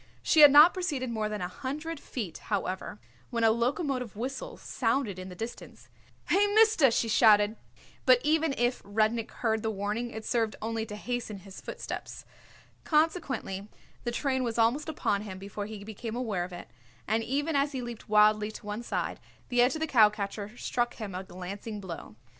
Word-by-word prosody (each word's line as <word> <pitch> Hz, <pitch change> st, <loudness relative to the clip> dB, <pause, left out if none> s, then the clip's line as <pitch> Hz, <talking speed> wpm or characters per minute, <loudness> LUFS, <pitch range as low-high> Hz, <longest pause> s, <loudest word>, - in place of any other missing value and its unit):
She 315 Hz, -, +3 dB
had 295 Hz, -1 st, +11 dB
not 300 Hz, +5 st, +8 dB
proceeded 295 Hz, -10 st, -2 dB
more 215 Hz, -2 st, -1 dB
than 210 Hz, -2 st, -4 dB
a 180 Hz, -, -1 dB
hundred 295 Hz, -, -5 dB
feet, 210 Hz, -, -6 dB
however, 190 Hz, -, -3 dB, 0.3 s
when 230 Hz, -1 st, -1 dB
a 225 Hz, -, +6 dB
locomotive 250 Hz, -, -1 dB
whistle 260 Hz, +5 st, -5 dB
sounded 225 Hz, -5 st, -1 dB
in 185 Hz, 0 st, -7 dB
the 180 Hz, -, -9 dB
distance. 225 Hz, +6 st, -8 dB, 0.4 s
"Hey, 400 Hz, +3 st, +4 dB
mister!" 435 Hz, -10 st, +6 dB
she 230 Hz, 0 st, +1 dB
shouted; 215 Hz, -1 st, +5 dB, 0.5 s
but 255 Hz, -1 st, +7 dB
even 310 Hz, -1 st, +2 dB
if 240 Hz, +1 st, +1 dB
Rudnik 220 Hz, +3 st, 0 dB
heard 220 Hz, -2 st, -1 dB
the 220 Hz, -, -1 dB
warning 210 Hz, +3 st, -2 dB
it 220 Hz, -2 st, -7 dB
served 225 Hz, -2 st, 0 dB
only 225 Hz, 0 st, -3 dB
to 210 Hz, -, -6 dB
hasten 240 Hz, -1 st, -4 dB
his 195 Hz, 0 st, -11 dB
footsteps. -, -, -7 dB, 0.6 s
Consequently 300 Hz, -, 0 dB, 0.4 s
the 240 Hz, -, -1 dB
train 260 Hz, +1 st, 0 dB
was 235 Hz, -2 st, -2 dB
almost 240 Hz, +7 st, +2 dB
upon 205 Hz, -9 st, 0 dB
him 195 Hz, -3 st, -7 dB
before 200 Hz, +1 st, -6 dB
he 215 Hz, -2 st, -8 dB
became 220 Hz, +2 st, -6 dB
aware 215 Hz, -8 st, -1 dB
of 180 Hz, -, -11 dB
it, 175 Hz, -, -8 dB, 0.4 s
and 220 Hz, +2 st, +1 dB
even 290 Hz, +6 st, -1 dB
as 280 Hz, +1 st, +1 dB
he 260 Hz, -2 st, -3 dB
leaped 235 Hz, -2 st, -8 dB
wildly 210 Hz, 0 st, +5 dB
to 215 Hz, -, -10 dB
one 210 Hz, +2 st, -4 dB
side 240 Hz, -, -3 dB, 0.3 s
the 245 Hz, -1 st, +3 dB
edge 250 Hz, +5 st, +3 dB
of 315 Hz, -, -5 dB
the -, -, +2 dB
cowcatcher 210 Hz, -3 st, +2 dB
struck 240 Hz, -1 st, -1 dB
him 210 Hz, -4 st, -6 dB
a 185 Hz, +1 st, -4 dB
glancing 195 Hz, +4 st, -7 dB
blow. 170 Hz, -, -8 dB
225 Hz, 180 wpm, -29 LUFS, 210-260 Hz, 0.6 s, had